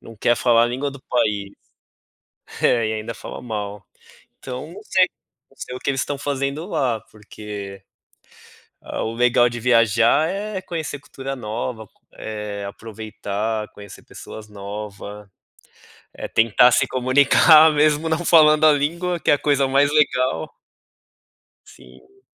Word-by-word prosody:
não 115 Hz, -, -13 dB
quer 120 Hz, +3 st, +2 dB
falar 115 Hz, -2 st, +4 dB
a -, -, +1 dB
língua 130 Hz, +4 st, -3 dB
do 140 Hz, -1 st, -12 dB
país, 105 Hz, -5 st, 0 dB, 1.1 s
é 115 Hz, -3 st, +3 dB
e -, -, -2 dB
ainda 110 Hz, +2 st, -5 dB
falam -, -, -9 dB
mal. 105 Hz, -4 st, -5 dB, 0.5 s
Então, 130 Hz, +5 st, -7 dB
não 205 Hz, +3 st, -11 dB
sei 185 Hz, -3 st, +3 dB, 0.4 s
não -, -, -26 dB
sei 125 Hz, -, -7 dB
o -, -, -9 dB
que -, -, -1 dB
eles 135 Hz, -1 st, -1 dB
estão 145 Hz, -, -3 dB
fazendo 140 Hz, +2 st, -3 dB
lá 120 Hz, -, -1 dB
porque 105 Hz, -2 st, -9 dB, 1.0 s
a -, -, -5 dB
o 110 Hz, -, -4 dB
legal 120 Hz, 0 st, +3 dB
de 120 Hz, 0 st, -6 dB
viajar 115 Hz, +4 st, +3 dB
é 200 Hz, +1 st, -4 dB
conhecer 160 Hz, -4 st, -5 dB
cultura 135 Hz, -1 st, -7 dB
nova, 110 Hz, -1 st, -5 dB, 0.3 s
eh, 105 Hz, -2 st, -6 dB
aproveitar, 110 Hz, 0 st, -5 dB
conhecer 100 Hz, 0 st, -13 dB
pessoas 105 Hz, -1 st, -11 dB
nova, 105 Hz, 0 st, -8 dB, 0.8 s
é -, -, -6 dB
tentar 115 Hz, +2 st, +4 dB
se 130 Hz, -, +3 dB
comunicar 140 Hz, +5 st, +5 dB
mesmo 150 Hz, +1 st, +2 dB
não 160 Hz, +2 st, -1 dB
falando 155 Hz, -2 st, +5 dB
a 155 Hz, -, +7 dB
língua, 170 Hz, +4 st, -1 dB
que -, -, +1 dB
é -, -, +6 dB
a -, -, -2 dB
coisa 140 Hz, -2 st, +1 dB
mais 140 Hz, +1 st, +3 dB
legal. 130 Hz, -4 st, +1 dB, 1.1 s
Sim. 390 Hz, 0 st, -19 dB
125 Hz, 145 wpm, -21 LUFS, 110-145 Hz, 1.1 s, a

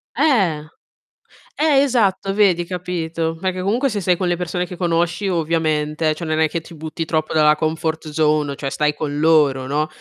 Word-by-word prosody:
Eh. 200 Hz, -, +2 dB, 0.9 s
Eh, 295 Hz, -3 st, +3 dB
esatto 205 Hz, -7 st, +1 dB
vedi, 190 Hz, -4 st, +3 dB
capito. 165 Hz, -2 st, -3 dB
Perché 185 Hz, 0 st, -2 dB
comunque 235 Hz, +9 st, +1 dB
se 210 Hz, -3 st, -3 dB
sei 180 Hz, -1 st, +2 dB
con 185 Hz, -, -1 dB
le 175 Hz, -, +1 dB
persone 180 Hz, +1 st, -3 dB
che 180 Hz, -, -8 dB
conosci, 175 Hz, +2 st, 0 dB
ovviamente, 155 Hz, -2 st, 0 dB
cioè, 170 Hz, -, -6 dB
non 155 Hz, 0 st, 0 dB
è 160 Hz, -1 st, +3 dB
che 170 Hz, -, -2 dB
ti 160 Hz, -, -14 dB
butti 160 Hz, +1 st, -5 dB
troppo 155 Hz, -1 st, -1 dB
dalla 150 Hz, -1 st, +5 dB
comfort 160 Hz, 0 st, -2 dB
zone 150 Hz, -2 st, +1 dB
cioè, 140 Hz, -1 st, -4 dB
stai 150 Hz, +1 st, 0 dB
con 145 Hz, -1 st, -3 dB
loro, 150 Hz, -5 st, +3 dB
no, 150 Hz, +2 st, 0 dB
165 Hz, 180 wpm, -20 LUFS, 155-180 Hz, 0.9 s, dalla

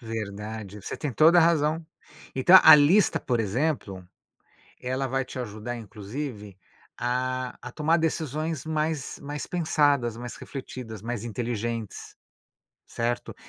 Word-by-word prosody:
Verdade, 105 Hz, -2 st, -6 dB
você -, -, -6 dB
tem 145 Hz, -4 st, -4 dB
toda 160 Hz, +7 st, +6 dB
a 170 Hz, -, +7 dB
razão. 160 Hz, 0 st, +2 dB, 0.5 s
Então 175 Hz, +8 st, +8 dB
a -, -, +11 dB
lista, 150 Hz, +8 st, +4 dB
por 120 Hz, -2 st, -1 dB
exemplo, 105 Hz, -, -2 dB, 0.7 s
ela 130 Hz, +2 st, -2 dB
vai 135 Hz, +1 st, -1 dB
te 130 Hz, -, -9 dB
ajudar 120 Hz, 0 st, -5 dB
inclusive 105 Hz, -1 st, -7 dB, 0.4 s
a 125 Hz, +1 st, -2 dB
a 120 Hz, -, -8 dB
tomar 160 Hz, +4 st, +2 dB
decisões 155 Hz, -1 st, -2 dB
mais 155 Hz, -2 st, -2 dB
mais 145 Hz, -1 st, -5 dB
pensadas, 145 Hz, -8 st, +1 dB
mais 120 Hz, -1 st, -7 dB
refletidas, 125 Hz, -6 st, -8 dB
mais 115 Hz, -1 st, -4 dB
inteligentes, 115 Hz, -1 st, -4 dB, 0.7 s
certo. 120 Hz, +1 st, -3 dB
125 Hz, 125 wpm, -26 LUFS, 110-150 Hz, 0.7 s, a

